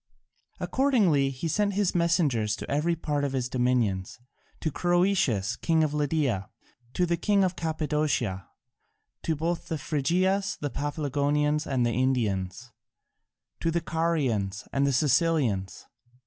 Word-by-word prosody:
Accordingly 200 Hz, -, +2 dB
he 135 Hz, +5 st, -4 dB
sent 200 Hz, +4 st, 0 dB
his 200 Hz, -2 st, +1 dB
messengers 150 Hz, -, +1 dB
to -, -, -8 dB
every 155 Hz, +4 st, +1 dB
part 150 Hz, -3 st, -2 dB
of 140 Hz, -1 st, -1 dB
his 130 Hz, -2 st, -1 dB
dominions: 120 Hz, -7 st, 0 dB, 0.4 s
to 155 Hz, -, -1 dB
Croesus, 175 Hz, -, +1 dB
king 160 Hz, -1 st, +2 dB
of 150 Hz, -1 st, -1 dB
Lydia, 145 Hz, -9 st, 0 dB, 0.5 s
to 180 Hz, -, +2 dB
the 170 Hz, 0 st, 0 dB
king 200 Hz, 0 st, +2 dB
of 185 Hz, -1 st, 0 dB
Cappadocia, 150 Hz, -, -1 dB, 0.7 s
to 160 Hz, -, -1 dB
both 165 Hz, +3 st, -2 dB
the 160 Hz, -, -2 dB
Phrygias, 185 Hz, +8 st, 0 dB
to -, -, -29 dB
the 145 Hz, -, -1 dB
Paphlagonians 145 Hz, +1 st, 0 dB
and 130 Hz, -3 st, +1 dB
the 120 Hz, -, +1 dB
Indians, 115 Hz, -4 st, -1 dB, 0.9 s
to 165 Hz, -, 0 dB
the 170 Hz, +1 st, +1 dB
Carians 135 Hz, -, -1 dB
and 140 Hz, 0 st, +2 dB
the -, -, +2 dB
Cilicians. 130 Hz, -, +1 dB
150 Hz, 135 wpm, -27 LUFS, 125-170 Hz, 0.9 s, Accordingly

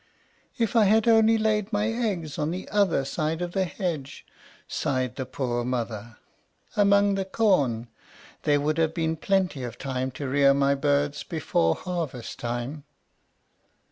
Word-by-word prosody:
"If 230 Hz, -1 st, 0 dB
I 225 Hz, -2 st, +6 dB
had 220 Hz, +3 st, +3 dB
only 225 Hz, 0 st, +5 dB
laid 215 Hz, -1 st, 0 dB
my 210 Hz, +1 st, +1 dB
eggs 205 Hz, -10 st, -2 dB
on 150 Hz, +1 st, 0 dB
the 180 Hz, +3 st, -5 dB
other 195 Hz, -9 st, +2 dB
side 155 Hz, +3 st, -2 dB
of 175 Hz, -1 st, -3 dB
the 190 Hz, 0 st, 0 dB
hedge," 165 Hz, -7 st, -4 dB, 0.4 s
sighed 130 Hz, -2 st, -1 dB
the 130 Hz, -, -4 dB
poor 120 Hz, -3 st, -2 dB
mother, 115 Hz, -3 st, -4 dB, 0.6 s
"among 200 Hz, 0 st, +4 dB
the 195 Hz, 0 st, 0 dB
corn, 180 Hz, -, +1 dB, 0.5 s
there 145 Hz, -1 st, +2 dB
would 155 Hz, +2 st, 0 dB
have 160 Hz, 0 st, +1 dB
been 160 Hz, -1 st, 0 dB
plenty 185 Hz, -3 st, 0 dB
of 120 Hz, -1 st, -6 dB
time 130 Hz, -1 st, -2 dB
to 140 Hz, +1 st, -5 dB
rear 140 Hz, +1 st, +4 dB
my 140 Hz, 0 st, +3 dB
birds 145 Hz, +1 st, 0 dB
before 110 Hz, -, 0 dB
harvest 165 Hz, -10 st, -5 dB
time." 120 Hz, +5 st, -4 dB
155 Hz, 150 wpm, -26 LUFS, 130-195 Hz, 0.6 s, I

